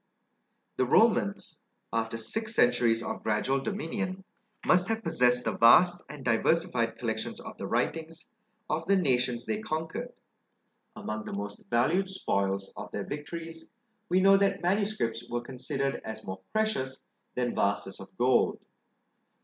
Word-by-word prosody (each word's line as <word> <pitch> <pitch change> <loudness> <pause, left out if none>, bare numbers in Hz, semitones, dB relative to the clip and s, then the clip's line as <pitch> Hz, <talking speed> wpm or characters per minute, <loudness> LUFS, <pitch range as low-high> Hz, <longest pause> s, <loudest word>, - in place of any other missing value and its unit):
The - - +2
Romans, - - +2 0.3
after 115 0 -1
six 220 - -2
centuries 120 -2 +3
of - - -4
gradual 110 +6 +1
dominion, 185 +2 -3 0.4
must 180 0 +4
have 225 0 -1
possessed 125 -7 +3
the - - -1
vast 175 +10 +6
and 145 -3 -9
diversified 120 0 +1
collections 110 -2 -3
of - - -9
the - - -4
writings 165 0 -2 0.4
of 155 +2 -1
the 200 - +5
nations 125 -8 +1
they 210 - -1
conquered: 210 +6 -4 0.8
among 110 0 -5
the - - -6
most 100 +1 -6
valued 160 +12 +2
spoils 100 - -1
of - - -7
their 100 - -4
victories, 165 +2 -7 0.4
we 185 +1 +3
know 195 +1 +7
that 195 -1 +1
manuscripts 185 - -1
were 120 0 -2
considered 135 +2 -3
as 110 0 -7
more 95 0 -6
precious 135 -13 -1 0.3
than 125 -1 0
vases 100 -1 -1
of 95 - -10
gold. 125 +1 +3
135 Hz, 140 wpm, -29 LUFS, 115-180 Hz, 0.8 s, know